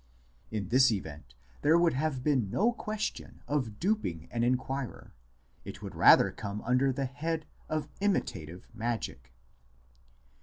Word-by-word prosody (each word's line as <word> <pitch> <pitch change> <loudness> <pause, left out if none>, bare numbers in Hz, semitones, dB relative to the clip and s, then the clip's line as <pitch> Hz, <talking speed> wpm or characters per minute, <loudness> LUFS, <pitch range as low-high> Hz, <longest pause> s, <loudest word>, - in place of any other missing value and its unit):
In 105 -4 -3
this 130 0 +6
event 75 - -5 0.3
there 160 +3 +5
would 170 -1 +4
have 135 -1 -1
been 130 -9 +2
no 220 - +2
question 215 -2 -5
of 130 -8 -1
duping 170 - -1
an 115 -1 0
inquirer, 130 +1 -2 0.5
it - - -9
would - - -6
rather - - +7
come 100 0 -6
under 125 +3 +3
the 135 +1 -2
head 155 +4 -3 0.2
of 155 -1 -1
imitative 90 - -2
magic. 110 - -4
130 Hz, 130 wpm, -30 LUFS, 105-155 Hz, 0.5 s, rather